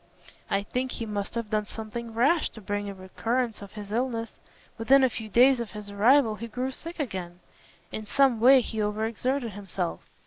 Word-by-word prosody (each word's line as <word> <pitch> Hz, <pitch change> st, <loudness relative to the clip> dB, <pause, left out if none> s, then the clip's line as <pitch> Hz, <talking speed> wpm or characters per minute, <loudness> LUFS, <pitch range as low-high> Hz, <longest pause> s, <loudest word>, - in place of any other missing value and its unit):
I 195 Hz, 0 st, +1 dB
think 250 Hz, +5 st, -2 dB
he 230 Hz, -, -4 dB
must 205 Hz, -1 st, -4 dB
have 230 Hz, -2 st, -3 dB
done 215 Hz, -1 st, +1 dB
something 225 Hz, +1 st, -6 dB
rash 285 Hz, +8 st, +3 dB
to -, -, -10 dB
bring 205 Hz, +1 st, -2 dB
on -, -, -4 dB
a 200 Hz, -, -7 dB
recurrence 225 Hz, +5 st, -2 dB
of 200 Hz, -1 st, -10 dB
his 205 Hz, -2 st, -8 dB
illness. 230 Hz, -1 st, -1 dB, 0.5 s
Within 265 Hz, +4 st, +5 dB
a 260 Hz, -, +4 dB
few 220 Hz, -1 st, -6 dB
days 250 Hz, +4 st, +5 dB
of 235 Hz, -2 st, -5 dB
his 210 Hz, -1 st, -7 dB
arrival 225 Hz, +2 st, +4 dB
he 230 Hz, +3 st, -6 dB
grew 250 Hz, +3 st, -3 dB
sick 335 Hz, +6 st, -8 dB
again. 185 Hz, -, -4 dB, 0.5 s
In 215 Hz, -1 st, -5 dB
some 265 Hz, -1 st, +3 dB
way 260 Hz, +3 st, +7 dB
he 220 Hz, -2 st, -3 dB
over 210 Hz, +1 st, 0 dB
exerted 240 Hz, +2 st, -1 dB
himself." 190 Hz, -3 st, -4 dB
225 Hz, 200 wpm, -27 LUFS, 205-250 Hz, 0.5 s, way